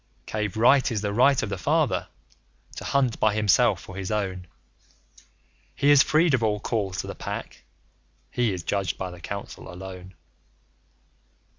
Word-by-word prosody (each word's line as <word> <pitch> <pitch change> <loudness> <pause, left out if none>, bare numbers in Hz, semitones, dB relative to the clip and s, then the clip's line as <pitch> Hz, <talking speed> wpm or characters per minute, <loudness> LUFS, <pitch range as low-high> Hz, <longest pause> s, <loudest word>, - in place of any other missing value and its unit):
Cave 105 -2 -3
Right 130 +4 +4
is 110 -3 -1
the 105 -1 -2
right 130 +4 +4
of - - -3
the - - -4
Father - - +1 0.7
to - - -6
hunt 130 -4 +1
by 105 -1 +2
himself 105 -3 +3
for 95 - -11
his 95 -1 -4
own. 95 -4 -2 1.3
He 145 - +3
is 145 -2 +8
freed 155 +1 +3
of 130 - +3
all 105 -2 +1
calls 100 -4 -2
to - - -10
the - - -5
Pack; - - -7 0.7
he 120 -3 +1
is 90 -3 -4
judged 95 -3 -1
by 95 -1 -4
the 90 -1 -12
Council 100 -3 -7
alone. 95 0 -9
105 Hz, 160 wpm, -25 LUFS, 95-120 Hz, 1.3 s, is